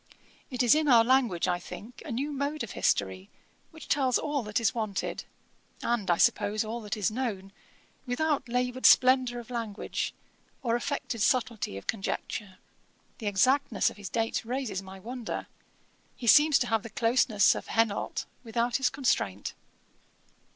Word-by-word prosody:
It 250 Hz, -2 st, -1 dB
is 240 Hz, -, +6 dB
in 310 Hz, 0 st, +2 dB
our 235 Hz, -4 st, +7 dB
language, 235 Hz, -9 st, +2 dB
I 175 Hz, -1 st, 0 dB
think, 220 Hz, +6 st, -10 dB
a 300 Hz, -, -7 dB
new 275 Hz, +6 st, -2 dB
mode 285 Hz, +1 st, -2 dB
of 235 Hz, -, -6 dB
history, 95 Hz, -1 st, 0 dB, 0.4 s
which 320 Hz, -2 st, -13 dB
tells 265 Hz, -3 st, +2 dB
all 290 Hz, -2 st, -1 dB
that 210 Hz, -1 st, -1 dB
is 225 Hz, -3 st, +1 dB
wanted, 215 Hz, -4 st, -3 dB, 0.6 s
and, 235 Hz, -5 st, -1 dB
I 175 Hz, -, +4 dB
suppose, 210 Hz, +5 st, +2 dB
all 230 Hz, +2 st, -4 dB
that 210 Hz, 0 st, -4 dB
is 210 Hz, 0 st, 0 dB
known, 215 Hz, -5 st, -3 dB, 0.6 s
without 280 Hz, +1 st, 0 dB
laboured 250 Hz, +1 st, +2 dB
splendour 255 Hz, -1 st, +5 dB
of 240 Hz, +1 st, -11 dB
language, 225 Hz, -4 st, -3 dB, 0.5 s
or 235 Hz, -2 st, +1 dB
affected 240 Hz, -2 st, -3 dB
subtilty 230 Hz, -, 0 dB
of 100 Hz, -, -9 dB
conjecture. 195 Hz, -1 st, -4 dB, 0.6 s
The 220 Hz, -, -4 dB
exactness 235 Hz, +3 st, +2 dB
of -, -, -15 dB
his 205 Hz, -2 st, -7 dB
dates 225 Hz, -1 st, -1 dB
raises 235 Hz, -5 st, -3 dB
my 190 Hz, 0 st, -11 dB
wonder. 240 Hz, +3 st, -5 dB, 0.7 s
He 245 Hz, -, -8 dB
seems 295 Hz, +5 st, +7 dB
to 245 Hz, -, -1 dB
have 225 Hz, -, +3 dB
the 230 Hz, -, -9 dB
closeness 230 Hz, -4 st, +3 dB
of -, -, -7 dB
Henault 225 Hz, -2 st, 0 dB, 0.2 s
without 235 Hz, +1 st, 0 dB
his 265 Hz, -2 st, +2 dB
constraint. 105 Hz, -, -1 dB
235 Hz, 160 wpm, -28 LUFS, 205-255 Hz, 0.7 s, our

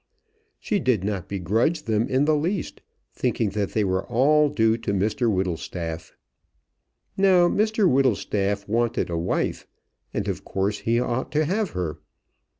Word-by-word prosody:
She 205 Hz, -, -1 dB
did 125 Hz, -, +1 dB
not 100 Hz, -2 st, -3 dB
begrudge 110 Hz, -, 0 dB
them 110 Hz, -2 st, 0 dB
in 130 Hz, +2 st, +2 dB
the 155 Hz, 0 st, +3 dB
least, 175 Hz, +6 st, -2 dB, 0.3 s
thinking 110 Hz, -4 st, -1 dB
that 100 Hz, 0 st, -2 dB
they 110 Hz, -, +2 dB
were 95 Hz, -1 st, 0 dB
all 145 Hz, +5 st, +3 dB
due 115 Hz, -5 st, +2 dB
to 100 Hz, -, -2 dB
Mr 110 Hz, +5 st, +1 dB
Whittlestaff. 85 Hz, -3 st, -3 dB, 1.0 s
Now 185 Hz, -3 st, +5 dB
Mr 215 Hz, +1 st, +2 dB
Whittlestaff 105 Hz, -, +1 dB
wanted 115 Hz, -3 st, 0 dB
a 85 Hz, -, -1 dB
wife, 85 Hz, -, -2 dB, 0.4 s
and, -, -, -3 dB
of -, -, -3 dB
course, 100 Hz, +2 st, -2 dB
he 115 Hz, +1 st, +1 dB
ought 125 Hz, +1 st, -2 dB
to 155 Hz, +1 st, +2 dB
have 195 Hz, +3 st, -1 dB
her. 80 Hz, -5 st, -3 dB
115 Hz, 150 wpm, -24 LUFS, 95-150 Hz, 1.0 s, Now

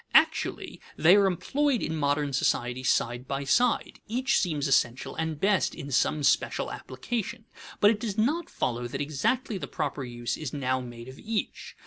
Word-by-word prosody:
Actually -, -, +2 dB, 0.2 s
they 170 Hz, +4 st, +7 dB
are 200 Hz, -1 st, +5 dB
employed 270 Hz, -, +1 dB
in 160 Hz, -, -2 dB
modern 145 Hz, -1 st, 0 dB
society 125 Hz, -1 st, 0 dB
side 120 Hz, 0 st, 0 dB
by 135 Hz, 0 st, -2 dB
side; 240 Hz, -, +1 dB
each 260 Hz, +4 st, +1 dB
seems 155 Hz, -5 st, 0 dB
essential 125 Hz, -2 st, +1 dB
and 160 Hz, -2 st, -3 dB
best 195 Hz, -1 st, +2 dB
in 140 Hz, -, -7 dB
some 145 Hz, +4 st, +2 dB
special 140 Hz, -, +1 dB
application. 235 Hz, -1 st, -5 dB, 0.3 s
But 205 Hz, -, +6 dB
it 215 Hz, -, -2 dB
does 215 Hz, -3 st, -4 dB
not 295 Hz, +11 st, +1 dB
follow 120 Hz, 0 st, -2 dB
that -, -, -5 dB
exactly 185 Hz, -, -1 dB
the 140 Hz, -, -5 dB
proper 140 Hz, 0 st, -3 dB
use 120 Hz, -1 st, -4 dB
is 155 Hz, -4 st, -5 dB
now 130 Hz, -2 st, 0 dB
made 120 Hz, -1 st, -9 dB
of 130 Hz, +1 st, -11 dB
each. 220 Hz, -1 st, -4 dB
150 Hz, 170 wpm, -28 LUFS, 130-215 Hz, 0.3 s, they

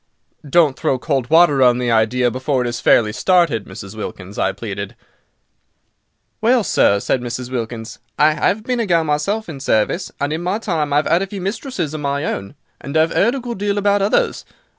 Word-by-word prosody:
"Don't 155 Hz, -3 st, +4 dB
throw 130 Hz, -, +1 dB
cold 135 Hz, -2 st, -2 dB
water 160 Hz, -4 st, +5 dB
on 125 Hz, -1 st, +5 dB
the 125 Hz, -1 st, -1 dB
idea 120 Hz, +2 st, +2 dB
before 130 Hz, +1 st, -1 dB
it -, -, -2 dB
is 120 Hz, 0 st, -3 dB
fairly 110 Hz, -3 st, +3 dB
started, 170 Hz, -, +2 dB
Mrs. 95 Hz, +1 st, -9 dB
Wilkins," 100 Hz, -2 st, -7 dB
I 95 Hz, -, +1 dB
pleaded. 100 Hz, -1 st, -6 dB, 1.5 s
"Well, 235 Hz, +1 st, +3 dB
sir," 100 Hz, -, +3 dB
said 125 Hz, +4 st, -1 dB
Mrs. 125 Hz, +1 st, -5 dB
Wilkins, 115 Hz, -2 st, -5 dB, 0.2 s
"I 150 Hz, +1 st, +4 dB
'ave 205 Hz, +3 st, -2 dB
been 250 Hz, +1 st, -1 dB
a 230 Hz, -, -1 dB
gal 170 Hz, -3 st, +3 dB
myself 160 Hz, +9 st, -1 dB
in 155 Hz, -5 st, -7 dB
service; 135 Hz, -, 0 dB
and 145 Hz, +2 st, -1 dB
in 160 Hz, -, -3 dB
my 180 Hz, +4 st, -1 dB
time 165 Hz, -9 st, -2 dB
I've 145 Hz, +1 st, +2 dB
'ad 170 Hz, +3 st, +2 dB
a 195 Hz, -, -2 dB
few 195 Hz, 0 st, -7 dB
mistresses 195 Hz, -, -3 dB
of 155 Hz, -, -5 dB
my 140 Hz, +1 st, -1 dB
own, 100 Hz, -3 st, -4 dB, 0.2 s
and 140 Hz, +3 st, -3 dB
I've 160 Hz, +1 st, +2 dB
'eard 235 Hz, +6 st, +3 dB
a -, -, -3 dB
good 240 Hz, -4 st, -6 dB
deal 205 Hz, 0 st, -1 dB
about 205 Hz, 0 st, +2 dB
others. 200 Hz, +2 st, +1 dB
150 Hz, 200 wpm, -19 LUFS, 120-190 Hz, 1.5 s, water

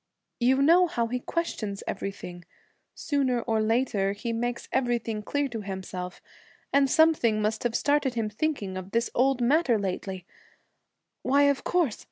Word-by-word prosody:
'You 260 Hz, +3 st, +3 dB
know 350 Hz, +4 st, +6 dB
how 235 Hz, -8 st, -1 dB
he 250 Hz, +1 st, -2 dB
questions 225 Hz, -, -3 dB
everything 180 Hz, -3 st, -6 dB, 0.5 s
sooner 270 Hz, -5 st, 0 dB
or 225 Hz, -2 st, 0 dB
later 215 Hz, -3 st, +1 dB
he 230 Hz, +3 st, -4 dB
makes 240 Hz, +1 st, -3 dB
everything 235 Hz, -4 st, 0 dB
clear 285 Hz, +7 st, -1 dB
to 225 Hz, -3 st, -5 dB
himself 190 Hz, -2 st, -6 dB, 0.5 s
and 275 Hz, -1 st, +4 dB
something 305 Hz, -9 st, +4 dB
must 215 Hz, +2 st, -1 dB
have 240 Hz, -2 st, -1 dB
started 285 Hz, -3 st, +1 dB
him 225 Hz, -2 st, 0 dB
thinking 210 Hz, -4 st, -2 dB
of 185 Hz, +1 st, -8 dB
this 230 Hz, 0 st, +1 dB
old 260 Hz, 0 st, +2 dB
matter 260 Hz, -1 st, +3 dB
lately 190 Hz, -2 st, -4 dB, 1.0 s
Why, 280 Hz, +2 st, +3 dB
of 280 Hz, -1 st, +2 dB
course! 340 Hz, -11 st, +1 dB
235 Hz, 150 wpm, -27 LUFS, 210-275 Hz, 1.0 s, know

